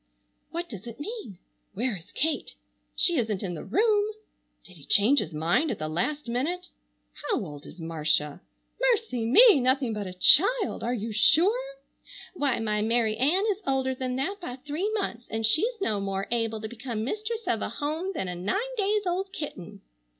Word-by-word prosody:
What 345 +1 -4
does 210 - -9
it 235 0 -9
mean? 410 - -7 0.4
Where 240 +1 0
is 170 -3 -13
Kate? 315 +1 -1 0.4
She 345 -3 +3
isn't 220 -5 -1
in 180 -3 -3
the 165 - -6
room! 420 - +2 0.5
Did 185 - -14
he 145 - -14
change 240 +8 +5
his 160 - -3
mind 170 - +1
at - - -2
the 155 - -4
last 245 - -2
minute? 330 +10 -2 0.4
How 295 - -2
old 145 -3 -10
is 180 - -13
Marcia? 155 -1 0 0.4
Mercy 455 - +1
me! 425 - +8
Nothing 255 -1 +2
but 210 -2 -4
a 185 - -7
child! 395 - +5
Are 235 - -1
you 225 0 -4
sure? 435 - +3 0.6
Why, 285 -8 0
my 210 -1 -1
Mary 225 0 +2
Ann 300 - +2
is 405 +1 -4
older 265 -1 +1
than 255 -1 -3
that 325 +10 -2
by 250 -8 -5
three 300 +9 -3
months, 240 - -3
and 225 0 -1
she's 430 - +2
no 215 - 0
more 195 0 -2
able 225 -2 -1
to 220 - -4
become 230 -1 -5
mistress 430 - -3
of 225 -10 0
a - - -2
home 310 - -3
than 190 - -2
a 180 - -3
nine 395 - -2
days 410 +1 +1
old 375 +2 -2
kitten. 285 - -7
255 Hz, 185 wpm, -27 LUFS, -, 0.6 s, me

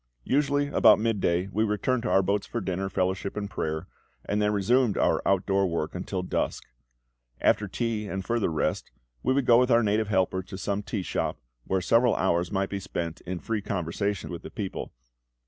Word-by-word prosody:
Usually 145 +1 +2
about - - +6
midday 95 -5 +1
we 110 +3 +1
returned 110 +4 0
to 120 - -2
our 95 - +4
boats 100 +2 0
for 120 - -3
dinner, 95 -1 -2
fellowship, 95 +2 -1
and 100 -1 -2
prayer, 80 -3 -3 0.4
and 105 +1 0
then 105 0 +2
resumed 105 +3 +2
our - - +2
out 95 -1 +2
door 100 -1 +2
work 85 -3 -2
until 90 +1 -3
dusk. - - -2 0.8
After - - +2
tea 115 -3 -2
and 95 -1 -4
further 115 -5 +1
rest, 80 - -1 0.3
we 130 - +1
would 135 0 +2
go 120 0 +6
with 125 0 +3
our 120 -1 +5
native 105 +1 +1
helpers 95 -2 0
to 95 - -8
some 100 +2 -2
tea 105 -1 -3
shop, - - -2 0.3
where 95 -1 0
several 115 +5 +3
hours 85 -1 +1
might 95 -1 -1
be 100 - -2
spent 85 -3 -4
in 90 0 -2
free 110 +4 -2
conversation 100 +1 -2
with 85 - -6
the - - -8
people. 100 -5 -5
100 Hz, 195 wpm, -27 LUFS, 95-115 Hz, 0.8 s, about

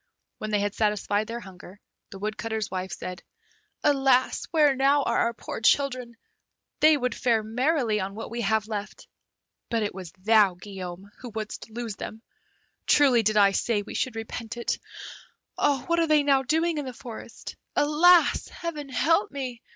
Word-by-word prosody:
When 215 - -4
they 210 -1 +1
had 205 0 -1
satisfied 210 0 0
their 235 +1 -5
hunger, 190 0 -13 0.3
the 195 - -9
Woodcutter's 215 +1 -3
wife 185 0 -4
said, 180 0 -6 0.6
"Alas! 270 -3 +3
where 300 -4 +4
now 275 +2 +3
are 235 - 0
our 235 - +2
poor 225 - -7
children; 250 -1 +1 0.6
they 310 0 +6
would 250 -3 -1
fare 230 -3 +1
merrily 245 0 +1
on 195 +1 -4
what 225 - -7
we 235 0 -3
have 215 0 +1
left. 210 -2 -6 0.6
But 230 -2 0
it 205 - -2
was 185 -3 -8
thou, 205 -1 +3
Guillaume, 190 0 -8
who 250 - -8
wouldst 220 0 -6
lose 225 -2 -5
them. 220 +1 -8 0.6
Truly 265 -5 +5
did 215 0 +1
I 200 -1 +6
say 205 +1 0
we - - -9
should 255 - -2
repent 225 +1 -6
it. 235 - -2 0.7
What 290 +4 +1
are 330 - +2
they 305 -1 +4
now 275 -2 +3
doing 320 +4 0
in 290 - -4
the 255 - -6
forest! 240 -2 -9 0.2
Alas! 330 +4 +4
Heaven 305 -5 -6
help 325 +9 +2
me! 255 -4 -6
230 Hz, 165 wpm, -26 LUFS, 210-275 Hz, 0.7 s, they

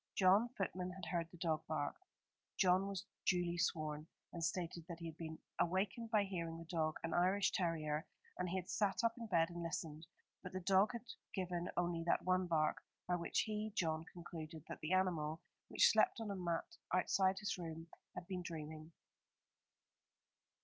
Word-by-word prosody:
John, 195 +5 +6
footman, 185 -2 -1
had 190 -1 -7
heard 170 -2 -1
the 175 - -13
dog 160 -2 +1
bark. 150 -2 -1 0.6
John 185 +1 +5
was 195 -2 -3 0.2
duly 175 -1 +2
sworn, 155 -2 0 0.3
and 170 - -3
stated 170 -1 -1
that 170 - -4
he 170 - -7
had 160 -1 -5
been 160 -1 -5 0.2
awakened 195 +6 +1
by 215 -2 +4
hearing 170 -4 -3
the 165 - -8
dog, 160 -2 0
an 165 - -1
Irish 190 +3 +4
terrier, 160 -3 0 0.3
and 180 -1 -1
he 180 - -1
had 185 -1 -2
sat 205 +2 +1
up 230 0 +4
in 230 - -4
bed 170 -4 +3
and 175 0 -5
listened; 160 -1 -4 0.3
but 185 - -7
the 185 - -1
dog 195 +5 +4
had 235 0 -5 0.3
given 180 -2 -1
only 175 -1 +1
that 170 - +2
one 185 0 +3
bark, 155 -2 +2 0.3
by 180 - +2
which 170 -1 +1
he, 215 0 -2
John, 160 -4 +1
concluded 160 -3 -7
that - - -6
the 155 +4 -1
animal, 165 -4 +2 0.3
which - - +6
slept - - +4
on 220 -2 -3
a - - -2
mat 175 - -2
outside 190 +1 +3
his 205 -2 -2
room, 165 -1 -5 0.3
had 180 - -5
been 185 0 -3
dreaming. 155 -1 -6
175 Hz, 180 wpm, -39 LUFS, 165-190 Hz, 0.6 s, John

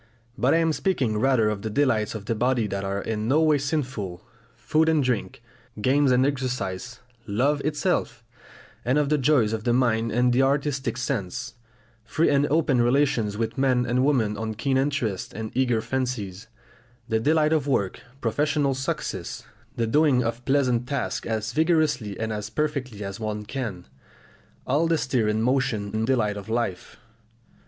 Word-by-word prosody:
But 130 +6 +2
I - - +5
am 165 -1 +2
speaking 135 - 0
rather 125 -3 +3
of 105 -2 -2
the 110 - -3
delights 115 -4 +1
of 105 -2 -6
the 115 - 0
body 120 0 +1
that 100 -1 -3
are 100 +1 -2
in 110 -1 -2
no 140 +5 +3
way 155 -2 +4
sinful, 130 - -3 0.3
food 160 0 +1
and 155 -3 +3
drink, 125 -2 -2 0.4
games 135 +5 +3
and 125 +1 +4
exercise, 125 -5 -3 0.3
love 135 +8 +1
itself; 150 +1 -1 0.6
and 125 +4 +1
of 145 -2 +1
the 150 -1 +2
joys 130 -6 +3
of 110 -1 -3
the 120 0 +2
mind 115 -2 +1
and 125 +1 +2
the 130 - +3
artistic 135 -3 0
sense; 120 -8 -3 0.5
free 145 +8 +1
and 140 0 +3
open 145 -4 +2
relations 120 -5 +1
with 115 +3 -2
men 130 -2 +2
and 125 +1 +1
women 115 -7 +1
of 110 0 -4
keen 135 +3 0
interests 130 -8 -1
and 110 0 -5
eager 120 -3 +2
fancies; 115 -6 -3 0.6
the 110 -2 +1
delights 155 +4 +3
of 150 -3 +1
work, 100 -9 0 0.2
professional 145 +4 +1
success, 135 0 -4 0.3
the 115 - 0
doing 135 +1 +3
of 115 +1 -3
pleasant 130 -3 +1
tasks 140 -1 -2
as 110 0 -2
vigorously 150 - +1
and 110 0 -2
as 105 0 -4
perfectly 130 -8 -3
as 100 +1 -6
one 105 -1 -4
can 110 -8 -5 0.8
all 145 +6 +2
the 165 0 +2
stir 125 -6 0
and 110 +1 +1
motion 115 -5 0
and 110 +1 -1
delight 110 -6 +1
of 100 +2 -8
life. 115 -6 -3
125 Hz, 170 wpm, -25 LUFS, 110-140 Hz, 0.8 s, I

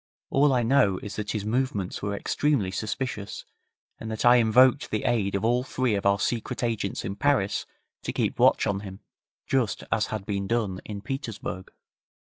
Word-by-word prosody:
All 140 +1 +4
I 125 -2 +2
know 115 -6 +3
is 105 - -6
that 105 -1 -4
his 105 -2 -3
movements 110 -5 -1
were 100 0 -2
extremely 130 -4 0
suspicious, 105 +1 -4 0.5
and 110 - -6
that 110 +1 -3
I 120 0 +8
invoked 125 +4 +4
the 110 - -2
aid 105 -5 +1
of 100 - -1
all 120 +2 +3
three 130 -2 0
of 100 -1 0
our 100 0 +4
Secret 115 +2 -2
Agents 110 -5 -2
in 100 - -3
Paris 130 -7 +1 0.3
to - - -3
keep - - -1
watch - - +5
on 100 -1 0
him, 95 -1 -9 0.4
just 130 -5 0
as 110 -1 +1
had 105 -3 -5
been 100 -2 -2
done 105 -5 -1
in 100 -2 -6
Petersburg. 115 -9 -5
110 Hz, 180 wpm, -26 LUFS, 100-125 Hz, 0.5 s, I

